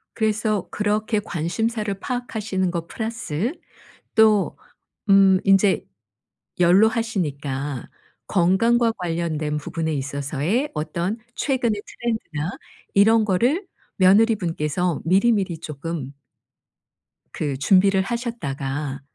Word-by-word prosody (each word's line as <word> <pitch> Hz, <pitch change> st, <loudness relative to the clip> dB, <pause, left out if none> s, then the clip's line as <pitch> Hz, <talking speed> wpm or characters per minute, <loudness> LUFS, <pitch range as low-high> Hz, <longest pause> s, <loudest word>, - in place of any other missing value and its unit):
그래서 215 Hz, -2 st, 0 dB
그렇게 210 Hz, +1 st, 0 dB
관심사를 210 Hz, +4 st, -2 dB
파악하시는 220 Hz, -7 st, -2 dB
것 170 Hz, -1 st, -4 dB
플러스 225 Hz, -, -3 dB, 0.6 s
또 215 Hz, -3 st, +4 dB, 0.5 s
음 195 Hz, -1 st, +6 dB
인제 195 Hz, 0 st, +4 dB, 0.7 s
연로하시니까 170 Hz, -, +1 dB, 0.4 s
건강과 225 Hz, +6 st, +3 dB
관련된 165 Hz, -4 st, -2 dB
부분에 160 Hz, +2 st, -3 dB
있어서의 145 Hz, -, -2 dB
어떤 170 Hz, +7 st, -2 dB, 0.2 s
최근의 240 Hz, -7 st, 0 dB
트렌드나 180 Hz, -9 st, -3 dB, 0.4 s
이런 220 Hz, +2 st, +5 dB
거를 245 Hz, -, +1 dB, 0.3 s
며느리분께서 180 Hz, -5 st, +2 dB
미리미리 190 Hz, -2 st, +2 dB
쪼끔 150 Hz, -2 st, -6 dB, 1.2 s
그 145 Hz, -3 st, -3 dB
준비를 190 Hz, +6 st, +4 dB
하셨다가 145 Hz, -, -4 dB
190 Hz, 235 characters per minute, -23 LUFS, 155-220 Hz, 1.2 s, 음